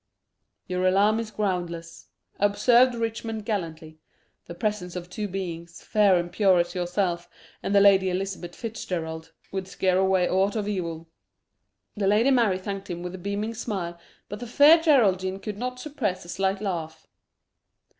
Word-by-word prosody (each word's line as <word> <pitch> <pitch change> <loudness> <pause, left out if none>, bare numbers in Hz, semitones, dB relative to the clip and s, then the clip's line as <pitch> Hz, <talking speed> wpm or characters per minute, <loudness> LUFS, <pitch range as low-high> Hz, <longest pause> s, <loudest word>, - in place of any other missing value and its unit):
"Your 185 0 0
alarm 205 +4 +3
is 230 -1 -4
groundless," 175 -5 -4 0.3
observed 235 +5 +4
Richmond 225 -1 -3
gallantly. 160 -7 -4 0.5
"The 170 - -8
presence 190 -2 -3
of 180 0 -7
two 210 +2 -3
beings, 175 -3 -6
fair 205 -3 +4
and 175 0 -3
pure 190 -1 +4
as 175 0 0
yourself 175 -1 -1 0.3
and 200 - -1
the 200 - +7
Lady 195 -1 +5
Elizabeth 185 -1 -4
Fitzgerald, 165 -8 -5 0.2
would 190 -1 -4
scare 185 -1 +1
away 190 -2 +3
aught 195 +3 +1
of 210 -2 -2
evil." 170 -5 -4 0.9
The 205 -2 0
Lady 220 +7 +4
Mary 230 -8 +3
thanked 195 +1 -6
him 175 0 -5
with 180 0 -5
a 185 - -7
beaming 200 +4 -3
smile, 190 -7 -4 0.3
but 205 - -7
the 240 - -6
Fair 295 +7 +7
Geraldine 195 - +3
could 210 0 -6
not 250 +1 -4
suppress 250 - -3
a - - -12
slight 195 +2 -1
laugh. 165 -6 -4
195 Hz, 155 wpm, -26 LUFS, 175-215 Hz, 0.9 s, the